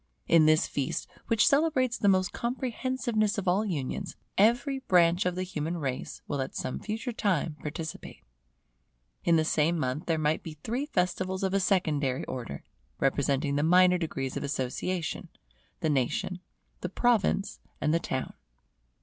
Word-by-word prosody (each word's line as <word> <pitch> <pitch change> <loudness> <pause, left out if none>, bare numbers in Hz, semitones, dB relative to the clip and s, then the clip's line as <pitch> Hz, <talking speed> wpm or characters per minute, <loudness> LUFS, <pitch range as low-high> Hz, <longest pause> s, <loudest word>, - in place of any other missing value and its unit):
In 160 -2 +6
this 155 0 +5
feast, 140 -2 -2 0.2
which 225 -2 +4
celebrates 275 -4 +3
the 205 - 0
most 185 -1 +2
comprehensiveness 240 -3 -1
of 200 - -3
all 190 +4 +3
unions, 180 0 -3 0.2
every 245 +6 +3
branch 180 -4 +3
of 180 - -1
the 185 - -1
human 165 -2 -3
race 135 -5 -4
will 140 -2 -1
at 130 - -5
some - - -3
future 220 +4 -4
time 185 -8 0
participate. 160 +1 -6 1.0
In 170 - +4
the 160 -1 +3
same 160 +2 +2
month 140 +3 -2
there 165 -2 +2
might 155 0 +1
be 155 -2 -8
three 255 +6 -2
festivals 185 -4 -1
of 190 0 0
a 195 - +3
secondary 150 -9 +1
order, 115 - -6 0.4
representing 140 +1 +1
the - - +2
minor 180 +3 +5
degrees 135 -6 -3
of - - -3
association, 145 +6 -3 0.5
the 160 - +1
Nation, 145 +7 0 0.4
the 180 - -4
Province, 210 -2 +1 0.2
and 150 - +1
the 165 - +3
Town. 130 -5 -3
175 Hz, 155 wpm, -29 LUFS, 150-205 Hz, 1.0 s, In